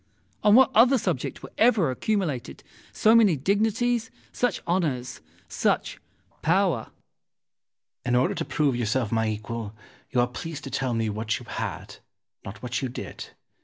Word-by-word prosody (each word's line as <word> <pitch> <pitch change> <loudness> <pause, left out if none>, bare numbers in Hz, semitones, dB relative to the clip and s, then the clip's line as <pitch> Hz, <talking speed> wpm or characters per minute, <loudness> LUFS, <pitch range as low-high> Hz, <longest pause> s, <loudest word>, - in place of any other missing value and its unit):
On 210 0 +6
what 260 0 +6
other 245 +5 +6
subject 175 - -3
were - - -9
ever 215 - +4
accumulated 145 - -2 0.3
so 220 - +4
many 220 -7 +6
dignities, 220 - +1 0.2
such 245 -6 0
honours, 150 -8 -1 0.3
such - - -1 0.4
power? 175 - +2
Ximenes. - - -38
In 125 - +2
order 125 +1 +2
to - - -3
prove 145 -2 +1
yourself 120 -1 -1
my 110 -1 +1
equal, 110 0 -5 0.3
you 125 - 0
are 120 - +3
pleased 140 +4 -7
to 135 - -7
tell 130 -3 -1
me 115 -1 0
what 110 +2 -2
you 125 - -11
had, - - -5 0.5
not 100 +5 -9
what 125 +1 -2
you 130 - -2
did. 120 - -7
135 Hz, 155 wpm, -26 LUFS, -, 0.5 s, On